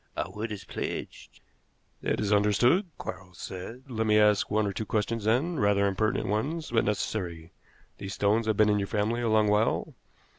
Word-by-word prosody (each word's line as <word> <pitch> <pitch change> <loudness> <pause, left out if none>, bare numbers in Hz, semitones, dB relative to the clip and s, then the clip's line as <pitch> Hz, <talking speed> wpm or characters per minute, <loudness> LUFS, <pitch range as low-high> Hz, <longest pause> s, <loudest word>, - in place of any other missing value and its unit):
Our - - -2
word 110 +2 -5
is 105 - -6
pledged." - - -6 0.6
"That - - -1
is 105 -1 +1
understood," 120 - +3
Quarles 95 -2 -8
said. 115 +8 -7
"Let 110 -4 -2
me 105 0 +4
ask 105 -1 +4
one 110 0 +1
or 100 - -2
two 110 - -3
questions, 110 +1 -1
then 140 +9 +1
rather 100 0 +3
impertinent 100 +2 0
ones, 140 - -2
but 115 -1 +2
necessary. 90 -5 -3 0.5
These 95 -1 -5
stones 110 +2 +2
have 110 -2 +1
been 110 0 +5
in 105 0 +2
your 100 - -2
family 110 +3 0
a 115 - 0
long 110 -1 +4
while?" 105 +2 +1
105 Hz, 185 wpm, -28 LUFS, 100-115 Hz, 0.6 s, been